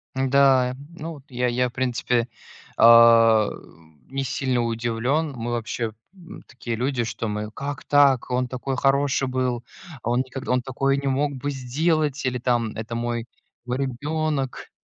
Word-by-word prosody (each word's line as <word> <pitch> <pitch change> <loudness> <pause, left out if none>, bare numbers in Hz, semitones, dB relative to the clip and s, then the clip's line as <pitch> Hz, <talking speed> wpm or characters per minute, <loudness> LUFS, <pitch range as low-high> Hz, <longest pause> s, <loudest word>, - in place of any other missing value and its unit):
Н-да, 130 -1 +3 0.2
ну 165 0 -6
вот, 145 -3 -13
я 125 -1 -1
я, 125 +1 +1
в - - -20
принципе, 125 -2 0 0.5
а, 115 -2 +7 0.6
не 135 +1 -2
сильно 130 -1 -1
удивлен. 120 +6 -1
Мы 120 0 -4
вообще, 115 -1 -3 0.2
м, 180 -4 -13
такие 120 -2 -5
люди, 125 +1 -1
что 115 0 -4
мы: 105 0 -3
"Как 140 +4 -6
так, 140 -3 +4
он 125 0 0
такой 130 +2 -4
хороший 135 0 +2
был, 130 -2 -1 0.4
он 120 +2 +1
никогд 130 +1 -5
он 125 0 +2
такое 135 +2 0
не 140 0 -3
мог 140 +2 0
бы 145 +2 -4
сделать", 145 +3 0
или 125 -1 0
там: 120 -3 0
"Это 110 +1 -6
мой 120 0 -2 0.4
мой 125 +1 -2
ребенок", 140 +1 -2
125 Hz, 155 wpm, -23 LUFS, 120-135 Hz, 0.6 s, а